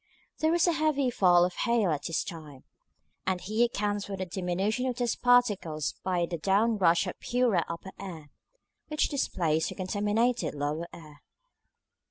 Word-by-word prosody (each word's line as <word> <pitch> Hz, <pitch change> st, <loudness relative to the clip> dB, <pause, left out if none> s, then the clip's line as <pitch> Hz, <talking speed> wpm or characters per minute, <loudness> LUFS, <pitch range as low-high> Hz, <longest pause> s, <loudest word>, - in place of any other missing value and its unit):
There 315 Hz, -, +2 dB
was 345 Hz, 0 st, +3 dB
a 350 Hz, -, +3 dB
heavy 305 Hz, -5 st, +1 dB
fall 175 Hz, -5 st, +5 dB
of 180 Hz, -, -3 dB
hail 230 Hz, -5 st, +1 dB
at 150 Hz, -, -1 dB
this 165 Hz, -, -1 dB
time, 155 Hz, -7 st, -9 dB, 0.6 s
and 185 Hz, -1 st, +1 dB
he 215 Hz, +6 st, 0 dB
accounts 205 Hz, -3 st, -1 dB
for 195 Hz, -1 st, -5 dB
the 185 Hz, -, -3 dB
diminution 190 Hz, +7 st, -1 dB
of 250 Hz, -, -1 dB
dust 240 Hz, -1 st, -2 dB
particles 205 Hz, -11 st, +2 dB
by 180 Hz, -2 st, 0 dB
the 170 Hz, -1 st, -5 dB
down 210 Hz, +5 st, +2 dB
rush 170 Hz, 0 st, +4 dB
of 180 Hz, -, -6 dB
purer 240 Hz, -8 st, +1 dB
upper 170 Hz, +3 st, -6 dB
air, 165 Hz, -7 st, -8 dB, 0.6 s
which 305 Hz, -1 st, 0 dB
displaced 165 Hz, -, 0 dB
the -, -, -7 dB
contaminated 210 Hz, +4 st, 0 dB
lower 150 Hz, +4 st, -2 dB
air. 150 Hz, -3 st, -13 dB
190 Hz, 165 wpm, -28 LUFS, 170-235 Hz, 0.6 s, fall